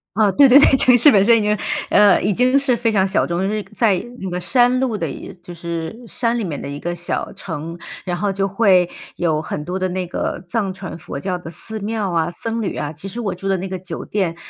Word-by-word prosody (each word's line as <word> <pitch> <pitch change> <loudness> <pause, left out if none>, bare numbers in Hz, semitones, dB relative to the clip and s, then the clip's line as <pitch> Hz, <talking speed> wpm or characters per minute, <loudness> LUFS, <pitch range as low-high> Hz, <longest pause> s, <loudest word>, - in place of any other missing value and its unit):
啊， 210 -1 +3
对 280 +6 +6
对 265 +2 +8
对。 275 -1 +6
城 250 -1 +5
市 265 +5 +6
本 195 -3 +5
身 235 +1 +6
已 - - -1
经， 210 0 +1 0.3
呃， 205 -2 +5
已 205 - +1
经 250 +5 +3
是 270 -3 +2
非 230 0 0
常 195 -3 +2
小 190 - +1
众。 170 0 -2
就 190 - 0
是 210 0 -2
在 215 -3 +3 0.2
那 190 - -4
个 180 0 -3
山 245 +6 +3
路 255 -4 0
的 170 -6 -2 0.3
就 175 0 -10
是 170 +6 -6
山 235 +1 -1
里 230 - -2
面 160 -7 -4
的 - - -6
一 140 +1 -6
个 175 +3 -3
小 175 0 -4
城， 165 +2 -7 0.2
然 180 -2 -2
后 195 +3 -1
就 195 0 -1
会 190 -3 +3 0.3
有 160 -3 0
很 150 -1 -5
多 180 +3 -3
的 185 0 -1
那 185 0 -2
个 175 - -4
藏 205 -2 -1
传 190 -1 -8
佛 140 - -7
教 180 +3 -3
的 170 - -9
寺 220 +6 -4
庙 210 -2 -2
啊、 165 -1 0
僧 225 +6 -2
侣 200 - -3
啊。 150 0 -4
其 160 +6 -8
实 220 +5 -6
我 200 -5 -2
住 185 +2 -7
的 195 -1 +1
那 185 +2 -4
个 185 -1 -5
酒 175 -2 -7
店， 185 -5 -1
195 Hz, 275 characters per minute, -19 LUFS, 175-225 Hz, 0.3 s, 对